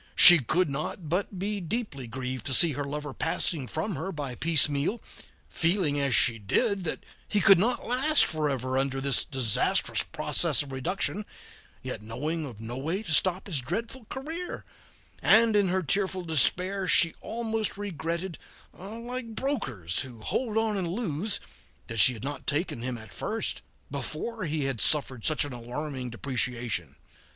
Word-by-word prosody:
She 175 -2 +10
could 175 +8 +1
not 150 +3 -5
but 190 +3 -2
be 200 +2 -2
deeply 170 - -4
grieved 130 0 -5
to 130 - +3
see 170 -2 +6
her 145 0 -3
lover 145 0 -5
passing 160 -3 0
from 160 - -3
her 160 +5 -4
by 145 -6 -5
piecemeal, 155 - +2 0.5
feeling, 165 -4 +1
as 140 -4 +1
she 115 -2 +4
did, 195 - 0
that 155 - -4 0.2
he 210 - +1
could 195 -2 +7
not 240 +6 0
last 270 +6 +4
forever 135 -4 -1
under 135 0 -1
this 135 -1 +2
disastrous 130 -6 +2
process - - +1
of 140 - -11
reduction, 180 +9 -1 0.6
yet - - -5
knowing 150 +9 -3
of 115 -5 -11
no 115 +3 -6
way 165 +10 -2
to 160 - -2
stop 185 +5 +3
its 165 -8 -1
dreadful 225 - -5
career, 320 +10 -6 0.6
and 225 0 +5
in 205 -2 +4
her 185 +1 0
tearful 190 +3 -1
despair 180 +5 +2
she 165 -2 +5
almost 225 -3 -2
regretted, 170 -3 -4 0.3
like 230 +4 -7
brokers 135 - -2
who 125 -4 -5
hold 220 - -2
on 220 -2 +1
and 185 -3 -1
lose, 195 0 -2 0.5
that 115 -1 -5
she 125 - +7
had 110 - -9
not 140 0 -5
taken 145 -4 -1
him 125 0 -3
at 110 -4 -12
first, - - -2 0.3
before 160 - -4
he 155 -2 -1
had 135 -5 -2
suffered 130 -6 +2
such 155 -1 +1
an 145 - -7
alarming 125 +2 -5
depreciation. 120 - -3
155 Hz, 160 wpm, -27 LUFS, 130-200 Hz, 0.6 s, She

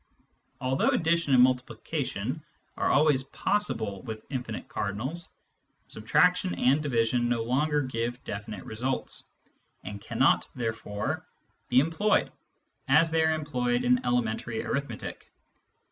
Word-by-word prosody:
Although 130 0 +1
addition 165 -4 +2
and 125 - +8
multiplication 130 0 -1 0.3
are - - 0
always 145 -2 +4
possible 115 - -1
with 110 -1 -7
infinite 125 -5 -4
cardinals, 125 - -3 0.6
subtraction 180 - +2
and 135 +4 +3
division 120 -3 +1
no 120 -2 +1
longer 145 +5 +1
giv^e 120 -1 -2
definite 100 -1 -6
results, 125 +4 -3 0.6
and 100 0 -7
cannot - - +2
therefore 110 -3 -3 0.4
be 125 - +6
employed 165 +9 +2 0.6
as 160 +4 +5
they 160 0 +3
are 160 0 +3
employed 125 -5 0
in 125 0 +3
elementary 120 -2 -1
arithmetic. 140 +1 -4
125 Hz, 115 wpm, -28 LUFS, 115-150 Hz, 0.6 s, and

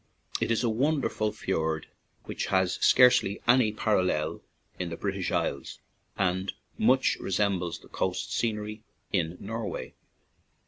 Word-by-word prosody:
It - - 0
is 115 +1 +1
a - - +2
wonder 140 +6 +1
ful 110 0 -1
fiord, 80 -6 -2 0.4
which - - -4
has 95 -1 +2
scare 125 -1 +8
e\y 100 +1 -4
any 120 -2 +5
parallel 90 -8 0 0.4
in 90 -2 -2
the 85 - -5
British 100 -2 -2
Isles 70 -1 -2 0.4
and 95 0 0 0.2
much 130 +4 +3
resembles 95 -4 0
the - - -17
coast 95 -1 -2
scenery 105 -1 -2 0.3
in 90 -2 0
Norway. 115 +1 -5
100 Hz, 135 wpm, -28 LUFS, 90-110 Hz, 0.4 s, scare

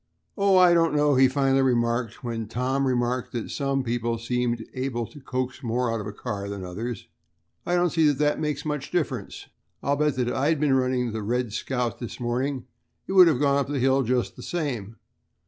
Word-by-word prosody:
"Oh, 200 -2 +4
I 180 -1 +7
don't 165 -3 +3
know," 145 0 +3
he 130 0 +6
finally 135 0 +2
remarked, 120 -2 0
when 115 -2 -3
Tom 130 +4 0
remarked 125 0 -1
that 120 -2 -4
some 135 -1 -1
people 115 -1 -1
seemed 120 0 -1
able 130 -2 -2
to 145 - -13
coax 130 0 -3
more 120 -1 0
out 115 - -2
of 105 - -6
a - - -4
car 100 -2 -5
than 100 -2 -5
others, 110 +7 -5 0.6
"I 175 - +2
don't 175 -1 +2
see 160 -2 +3
that 145 -2 +2
that 150 0 +1
makes 150 -1 -2
much 150 -2 -3
difference. 140 - -3 0.4
I'll 140 - +2
bet 150 -1 +1
that 125 -1 0
if - - -2
I 140 +3 +1
had 160 -2 +1
been 145 -2 +2
running 130 -2 +1
the 110 0 -4
'Red 120 +1 -1
Scout' 120 -1 -2
this 120 +1 -7
morning 125 +2 -2 0.4
it - - -6
would 185 -2 +8
have 155 -7 +2
gone 140 -1 +3
up 140 - -1
that 145 0 -2
hill 135 +1 +3
just 125 0 0
the - - -10
same. 125 - -3
130 Hz, 215 wpm, -25 LUFS, 120-145 Hz, 0.6 s, would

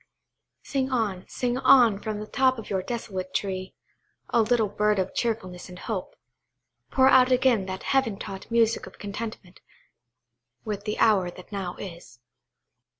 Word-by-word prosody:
Sing 270 -2 -1
on, 205 -7 -1
sing 245 0 -2
on, 245 -6 +6
from 215 -1 -4
the 210 - -5
top 260 +3 +2
of 225 - -8
your 190 -1 +1
desolate 190 -5 -5
tree, 185 -1 -3 0.6
oh, 235 - +5
little 225 -1 +2
bird 210 +1 +1
of 190 0 -1
cheerfulness 195 -7 -3
and 180 - -10
hope! 190 -1 -5 0.7
Pour 260 0 +4
out 260 -1 +6
again 250 -6 +3
that 190 0 -5
heaven 265 -7 +1
taught 195 0 -8
music 230 -1 +2
of - - -14
contentment 205 -2 -7 1.1
with 205 -2 -4
the 210 - -2
hour 200 -5 +4
that 180 +2 -13
now 190 -3 -4
is. 170 -10 -10
210 Hz, 150 wpm, -26 LUFS, 190-240 Hz, 1.1 s, on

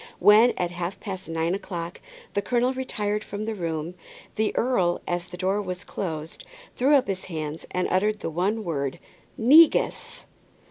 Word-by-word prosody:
When, 220 +4 +6
at 175 -1 -1
half 175 +2 -4
past 190 -4 -6
nine 165 +1 0
o'clock, 175 -3 -5 0.3
the 200 - +1
colonel 245 +4 +1
retired 210 -5 -2
from 205 +2 -5
the 225 - -2
room, 165 -3 -3 0.4
the 215 0 +1
earl, 190 -9 +1
as 175 0 -2
the 180 - -9
door 190 +3 0
was 185 -1 -5
closed, 160 -5 -5 0.3
threw 275 +4 +4
up 270 - +3
his 190 -2 -3
hands, 155 -2 -5
and 180 0 -1
uttered 210 +3 +1
the - - -3
one 200 +7 0
word 140 -7 -2 0.4
"negus!" 300 +8 +4
190 Hz, 160 wpm, -25 LUFS, 170-215 Hz, 0.4 s, When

